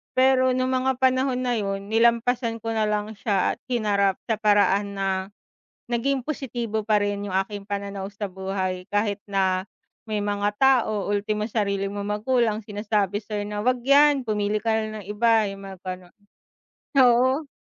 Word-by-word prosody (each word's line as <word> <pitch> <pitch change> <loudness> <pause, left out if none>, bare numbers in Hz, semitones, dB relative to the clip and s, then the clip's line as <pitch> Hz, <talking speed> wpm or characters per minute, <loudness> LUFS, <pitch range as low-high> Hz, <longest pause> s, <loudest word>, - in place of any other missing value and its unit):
Pero 260 0 +4
nung 255 0 0
mga 260 0 0
panahon 260 0 +2
na 245 -1 0
yun 195 -1 -3
nilampasan 235 +1 +2
ko 225 - -2
nalang 210 0 -1
siya 200 -2 0
at - - -34
hinarap 200 -4 +1
sa 225 - +1
paraan 205 -1 +2
na 195 - 0 0.8
naging 260 +3 0
positibo 235 -6 -3
pa 210 -1 +3
rin 205 0 -2
yung 195 - -5
aking 200 0 -7
pananaw 200 -1 -4
sa 205 0 -4
buhay, 190 -1 -3
kahit 205 -1 +1
na 190 -2 0 0.4
may 210 -1 -2
mga 205 0 0
tao, 230 -7 +3
ultimo 210 +1 -1
sarili 200 -2 0
mong 205 +1 -3
magulang 230 -3 +1
sinasabi 205 -1 -1
sayo 210 -1 -4
na 205 0 -4
wag 250 +2 0
'yan 280 0 +5
pumili 210 -1 -1
ka 225 - +1
na 215 -1 -2
ng - - -17
iba 225 +1 +3
yung 195 0 -9
mga 190 -1 -9
gano'n, 185 -1 -7 0.8
oo. 260 +4 +4
210 Hz, 160 wpm, -24 LUFS, 200-240 Hz, 0.8 s, yan